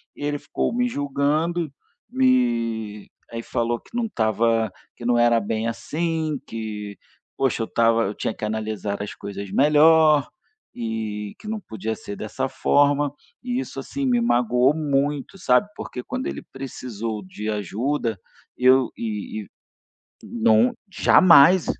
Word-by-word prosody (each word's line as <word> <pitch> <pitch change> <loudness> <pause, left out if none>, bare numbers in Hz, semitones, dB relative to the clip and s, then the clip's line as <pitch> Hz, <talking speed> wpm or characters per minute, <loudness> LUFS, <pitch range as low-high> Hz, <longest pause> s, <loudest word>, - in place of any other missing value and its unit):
e - - -8
ele 145 0 -1
ficou - - -2
me 245 0 +2
julgando, 150 - -1 0.4
me 115 - +1 0.2
aí 115 0 -5
falou 120 +1 -1
que - - -17
não 240 -1 0
estava, 115 - +1 0.2
que 120 - -10
não 120 0 +3
era 120 -1 +4
bem 110 +1 -2
assim, 155 +4 -2
que 105 -2 -6 0.4
poxa, 135 -3 +1
eu - - -4
estava 115 0 +3
eu 100 - -2
tinha - - -2
que - - -11
analisar 105 -2 -3
as 105 - -6
coisas 100 -1 -7
melhor 150 0 +5 0.5
e 110 -3 -4
que - - -11
não 220 0 -3
podia 110 - -5
ser 100 - -8
dessa - - -3
forma. 145 0 +2 0.3
E 250 0 -1
isso - - -6
assim 280 - -5
me 245 -2 +3
magoou 125 - +3
muito, 145 +1 -1
sabe? 130 +1 +3
Porque 125 - -7
quando 255 - -4
ele - - -4
precisou 115 -5 -5
de 105 +3 -6
ajuda, 110 +3 -2 0.4
e 125 - -3
eu 130 -1 +6
e 110 -1 -5 0.8
não 115 +1 +3 0.2
jamais, 180 -1 +6
120 Hz, 145 wpm, -23 LUFS, 110-150 Hz, 0.8 s, eu